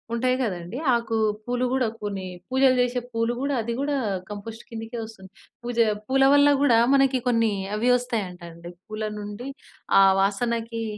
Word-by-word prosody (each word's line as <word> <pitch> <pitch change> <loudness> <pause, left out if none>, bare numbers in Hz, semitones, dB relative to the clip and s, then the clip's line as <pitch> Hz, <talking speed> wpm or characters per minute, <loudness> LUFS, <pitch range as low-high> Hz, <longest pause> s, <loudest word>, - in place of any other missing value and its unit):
ఉంటాయి 255 +2 +1
కదండీ, 185 +2 -4 0.2
ఆకు, 230 -1 -1 0.3
పూలు 245 +1 -1
గూడా 260 -3 +1 0.2
కొన్ని, 200 -2 -4 0.2
పూజలు 260 0 +4
చేసే 245 0 0
పూలు 230 +1 0
గూడా, 280 +1 -1
అది 235 +1 -3
గూడా, 285 0 0 0.4
కంపోస్ట్‌ 220 +3 -8
కిందికే 225 +1 -6
వస్తుంది. 195 -4 -13 0.3
పూజా 240 -1 +1 0.2
పూల 270 +1 +3
వల్ల 285 0 +6
గూడా 245 -5 +5 0.2
మనకి 270 -1 +3
కొన్ని, 230 -3 +2 0.2
అవి 230 +4 +1
ఒస్తాయంటండి, 180 -8 -6 0.2
పూల 215 0 -4 0.2
నుండి 205 +4 -7 0.5
ఆ - - +8 0.2
వాసనకీ 230 +3 -1
230 Hz, 150 wpm, -24 LUFS, 210-250 Hz, 0.5 s, ఆ